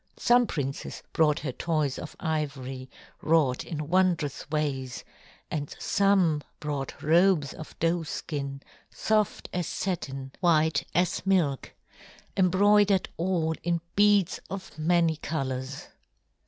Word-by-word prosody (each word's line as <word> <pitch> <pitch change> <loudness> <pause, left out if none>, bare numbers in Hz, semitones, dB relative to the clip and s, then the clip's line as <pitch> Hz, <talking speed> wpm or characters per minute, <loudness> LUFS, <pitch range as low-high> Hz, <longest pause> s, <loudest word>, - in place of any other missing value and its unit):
Some 245 0 +4
princes 140 -5 -4
brought 155 -2 +3
her 140 - -3
toys 150 -1 -1
of 160 - -8
ivory 140 -6 -3 0.3
wrought 155 -6 +2
in 150 -4 -5
wondrous 170 -6 +1
ways, 140 -4 -2 0.5
and 145 -2 -3
some 190 -7 +2 0.2
brought 145 -3 -4
robes 165 -2 +4
of 155 - -10
doeskin, 150 -4 -2 0.3
soft 215 -2 0
as 180 -3 -1
satin, 135 -7 -3
white 160 -3 +2
as 180 0 +1
milk, 175 -8 +1 0.6
embroidered 200 +1 +4
all 170 -2 0
in 170 0 0 0.2
beads 205 -3 +4
of 195 -1 -7
many 165 0 +2
colors. 135 -3 -4
160 Hz, 110 wpm, -27 LUFS, 145-185 Hz, 0.6 s, Some